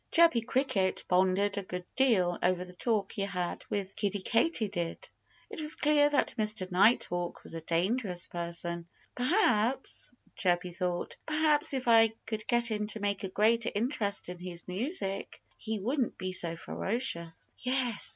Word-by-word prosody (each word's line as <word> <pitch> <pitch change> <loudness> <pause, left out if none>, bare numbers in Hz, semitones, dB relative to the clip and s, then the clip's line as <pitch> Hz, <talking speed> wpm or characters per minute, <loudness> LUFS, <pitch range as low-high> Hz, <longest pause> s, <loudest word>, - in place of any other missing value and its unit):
Chirpy 330 -8 +5
Cricket 225 -6 0
pondered 190 +2 +2
a - - -3
good 180 -1 -7
deal 195 -10 +2
over 180 0 +1
the 180 - -13
talk 205 +1 -1
he - - -5
had 180 -3 -3
with 195 -1 -3
Kiddie 200 -2 -2
Katydid. 215 - 0 0.4
It - - -7
was 300 0 +4
clear 295 -1 +3
that 290 - +1
Mr. 210 -3 0
Nighthawk 180 -3 +2
was - - -6
a 165 - -5
dangerous 180 +3 0
person. 170 0 -2 0.3
"Perhaps" 250 - +2 0.2
Chirpy 180 -1 0
thought 175 0 -3
"perhaps 305 -2 +2
if 255 -2 -4
I 225 -1 +5
could 220 -1 -4
get 240 -1 +3
him 210 -1 -2
to 220 - 0
take 205 0 -2
a 195 - -3
greater 225 +4 +2
interest 210 -3 0
in 180 0 -7
his 175 -1 -7
music 195 - -1 0.2
he 220 -1 -4
wouldn't 250 +4 -1
be 185 0 -4
so 170 -2 +3
ferocious. 170 -4 -1
Yes! 250 -3 +1
205 Hz, 155 wpm, -30 LUFS, 180-240 Hz, 0.4 s, Chirpy